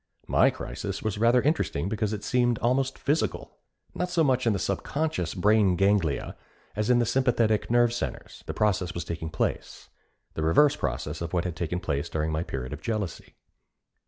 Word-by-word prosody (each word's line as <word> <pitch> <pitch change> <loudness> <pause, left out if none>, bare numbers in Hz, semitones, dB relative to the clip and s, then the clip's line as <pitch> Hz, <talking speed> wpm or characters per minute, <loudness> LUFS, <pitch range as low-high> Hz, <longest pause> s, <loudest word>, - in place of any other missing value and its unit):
My - - +4
crisis 100 -1 -5
was 110 -2 -2
rather 120 +2 +4
interesting 140 - 0
because 105 0 -1
it 105 -1 -4
seemed 120 +1 +2
almost 130 +3 0
physical. 150 +3 -2 0.3
Not 180 - -2
so 175 -2 +2
much 130 -4 +2
in 115 - +4
the - - 0
subconscious 100 - -2
brain 100 0 +3
ganglia 95 -5 +1 0.4
as 105 +2 -1
in 125 - +5
the 120 - +2
sympathetic 115 -3 +1
nerve 120 0 +4
centres, 120 - -5
the - - -3
process 95 -4 0
was 85 -1 -4
taking 80 -2 -4
place 80 - -3 0.4
the - - -4
reverse 110 - +4
process 75 +2 -3
of 85 0 -4
what 85 -1 +1
had 90 -2 -4
taken 85 +2 -2
place 80 -3 -2
during 80 0 -1
my 80 +1 -1
period 65 -5 -5
of 75 - -8
jealousy. 105 -3 -4
105 Hz, 180 wpm, -27 LUFS, 85-120 Hz, 0.4 s, in